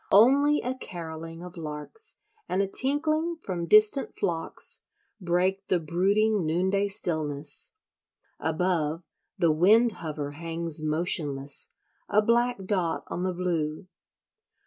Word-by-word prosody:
Only 280 +8 +5
a 250 - -1
carolling 165 -7 -8
of 180 0 -10
larks 155 - -3 0.3
and 185 - 0
a 200 - +3
tinkling 310 - +1
from 175 -3 -3
distant 215 - +5
flocks 165 -1 0 0.4
break 185 +2 0
the 180 - +2
brooding 195 +6 +1
noonday 190 +5 +1
stillness; 155 -6 -1 0.7
above, 160 -1 -1 0.3
the 170 -3 +3
wind 215 +9 +5
hover 150 -6 -5
hangs 165 0 -2
motionless, 150 -3 -1 0.4
a 210 +1 +3
black 235 -2 +1
dot 185 -4 -1
on 175 - -4
the 185 0 0
blue. 170 -2 -2
180 Hz, 115 wpm, -27 LUFS, 160-210 Hz, 0.7 s, Only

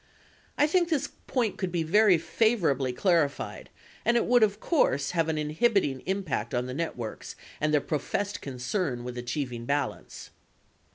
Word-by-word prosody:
I 295 - +5
think 345 +2 +2
this 285 -4 0 0.2
point 235 -6 0
could 185 -2 -2
be 170 -2 0
very 195 +3 +5
favorably 165 - +1
clarified 155 -1 0 0.3
and 235 - +3
it - - +2
would, 245 0 +4
of 210 -1 +3
course, 145 - +1
have 165 -2 +1
an 160 - 0
inhibiting 155 - +1
impact 175 - -2
on 125 0 0
the 125 - -5
networks 130 -7 -5 0.3
and 155 0 +2
their 150 -1 +3
professed 200 +8 -2
con 135 -2 -6
cern 125 - -2
with 125 0 -6
achieving 120 -1 -4
balance. 140 +1 -3
160 Hz, 160 wpm, -28 LUFS, 135-210 Hz, 0.3 s, I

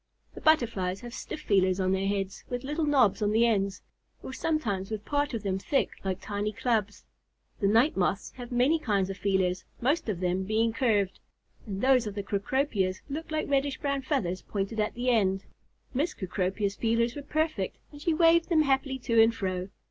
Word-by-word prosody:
The - - -10
Butterflies 220 -12 +2
have 240 -1 -8
stiff 305 - -6
feelers 190 -6 +2
on 185 0 +1
their 190 +1 +1
heads 195 -1 -2
with 245 0 -3
little 300 +3 -1
knobs 255 -8 +3
on 205 - +2
the 225 +2 +4
ends, 200 -4 0 0.4
or 260 - -6
sometimes 220 -13 -1
with 215 -1 -5
part 290 -2 0
of 220 - -4
them 190 -1 -1
thick 275 +7 0
like 190 -1 -2
tiny 205 +1 -3
clubs. 215 -2 -1 0.5
The 200 - +2
Night 230 +9 +4
Moths 190 +1 0
have 245 -1 -8
many 255 +7 +3
kinds 200 -8 0
of 190 - -7
feelers, 190 -2 +1 0.2
most 285 +2 +1
of 190 -5 -2
them 180 +1 0
being 220 +3 +1
curved, 210 -5 +1 0.5
and 195 -1 -4
those 255 -3 +4
of 205 - -5
the 200 - -3
Cecropias 200 -1 -1
look 315 +3 -4
like 310 0 -1
reddish 280 -1 +1
brown 280 -1 -1
feathers 200 - -1
pointed 205 +2 -3
at 210 - 0
the 250 +1 +1
end. 195 -4 +2 0.5
Miss 295 +7 0
Cecropia's 195 +1 -2
feelers 230 +1 +1
were 290 - -5
perfect, 310 - -1
and 290 -1 -12
she 335 - +1
waved 330 +1 +4
them 320 -3 +4
happily 270 -1 +1
to 230 -3 +3
and 225 +1 +4
fro. 185 -2 -3
225 Hz, 195 wpm, -28 LUFS, 195-270 Hz, 0.5 s, the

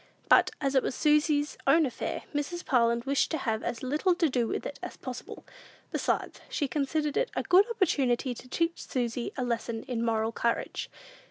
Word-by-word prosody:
But, - - +6
as 275 -2 0
it 265 - +5
was 255 - -3
Susy's 300 -1 +2
own 320 -1 +6
affair, 255 - -4
Mrs. 295 +4 -3
Parlin 235 -2 +2
wished 275 0 +2
to 320 - -1
have 225 -5 -1
as 240 0 -4
little 305 +8 +2
to 335 -3 +2
do 245 -3 +1
with - - -3
it 285 - -6
as - - -7
possible. 255 -1 -8 0.5
Besides, - - -1
she 290 - -1
considered 295 +1 -1
it - - +1
a - - 0
good 390 +4 +5
opportunity 275 - +1
to 250 - -12
teach 335 +4 -1
Susy 240 -1 -2
a 255 - 0
lesson 235 -1 -2
in 240 -3 -3
moral 225 -1 +1
courage. 235 0 -1
270 Hz, 185 wpm, -29 LUFS, 235-305 Hz, 0.5 s, But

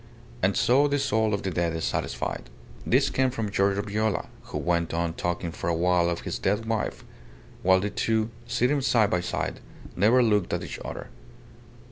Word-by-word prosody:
"And 95 +1 +2
so 140 +4 +4
the 145 0 +1
soul 110 -6 +1
of 100 - -1
the 95 - -2
dead 85 -1 0
is 80 - -3
satisfied." - - -3 0.4
This - - +3
came 130 0 +2
from 110 -5 -3
Giorgio 100 0 +1
Viola, 105 -2 -1 0.2
who - - -5
went 85 -1 0
on 85 0 -1
talking 85 0 -2
for 85 - -4
a 85 - +1
while 90 0 +2
of 85 0 -2
his - - -4
dead 105 +3 0
wife; 110 -1 -2 0.6
while 95 0 +5
the 105 +2 -2
two, 110 0 0 0.2
sitting 125 +5 +1
side 115 -6 +3
by 90 - +1
side, 90 - -3 0.4
never 115 +7 +4
looked 105 -5 +2
at - - -1
each - - -6
other. - - -7
100 Hz, 185 wpm, -26 LUFS, 85-115 Hz, 0.6 s, while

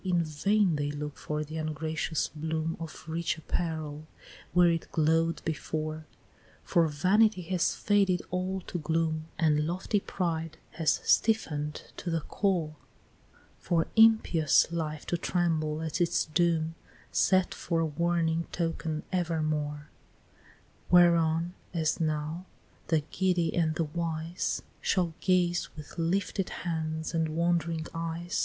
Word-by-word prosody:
In 175 -3 +2
vain 170 +3 +2
they 145 0 -1
look 145 0 -5
for 150 0 -3
the 155 +2 -7
ungracious 155 +1 -2
bloom 160 +1 -2
Of 165 -1 -8
rich 165 +1 -1
apparel 155 -2 -3 0.4
where 175 +1 +5
it 165 -1 -3
glow'd 165 +1 +1
before, 155 0 -3 0.6
For 170 -2 +3
Vanity 185 +6 +3
has 180 0 0
faded 195 -3 +2
all 185 +1 -1
to 175 - -5
gloom, 160 0 -1
And 150 -2 +2
lofty 185 +4 0
Pride 165 -4 -3
has 160 -1 +2
stiffen'd 150 -10 +1
to 175 - -4
the 165 -1 0
core, 170 -5 -1 0.8
For 165 -2 +1
impious 220 - +5
Life 155 -3 -3
to 175 - -1
tremble 160 -3 0
at 160 +2 -2
its 170 - +2
doom, 165 0 +1 0.4
Set 185 -1 +3
for 165 - -1
a 165 - +2
warning 165 +1 0
token 165 -2 -2
evermore, 155 -4 -1 1.0
Whereon, 170 -1 +4 0.2
as 160 -2 +1
now, 155 +3 -2 0.4
the 160 -2 +2
giddy 180 -3 +1
and 160 -2 +1
the 165 - +1
wise 165 +1 -2 0.2
Shall 175 -3 +1
gaze 175 -2 +2
with 150 +2 -10
lifted 185 +3 0 0.2
hands 160 -1 -2
and 165 -1 +1
wond'ring 165 0 0
eyes. 165 +1 -3
165 Hz, 125 wpm, -29 LUFS, 155-175 Hz, 1.0 s, where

